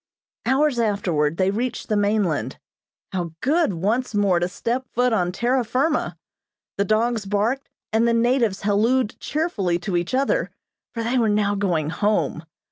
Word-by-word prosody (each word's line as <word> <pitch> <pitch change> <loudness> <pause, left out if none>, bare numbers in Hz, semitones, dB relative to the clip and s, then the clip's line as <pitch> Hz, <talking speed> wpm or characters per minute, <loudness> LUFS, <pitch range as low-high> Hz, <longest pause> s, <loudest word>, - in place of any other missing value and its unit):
Hours 270 -1 +2
afterward 175 -8 0
they 190 0 +2
reached 235 +4 -3
the 215 - 0
mainland. 205 -6 0 0.5
How 175 -4 -3
good 310 - +2
once 215 +8 -1
more 200 -4 +3
to 175 - 0
step 240 +7 -3
foot 245 0 +1
on 180 -4 +1
terra 245 +6 +1
firma! 275 +7 0 0.6
The 200 - +3
dogs 220 0 +1
barked, 220 +7 0 0.2
and 225 +1 +3
the 235 - +3
natives 235 -4 +1
hallooed 215 +3 +2
cheerfully 220 - -1
to 175 +1 -3
each 175 +8 -1
other, 275 - +1 0.5
for 230 - -2
they 245 +3 +1
were 225 -2 +2
now 205 -1 +2
going 175 -7 0
home. 205 -5 0
215 Hz, 155 wpm, -23 LUFS, 190-250 Hz, 0.6 s, more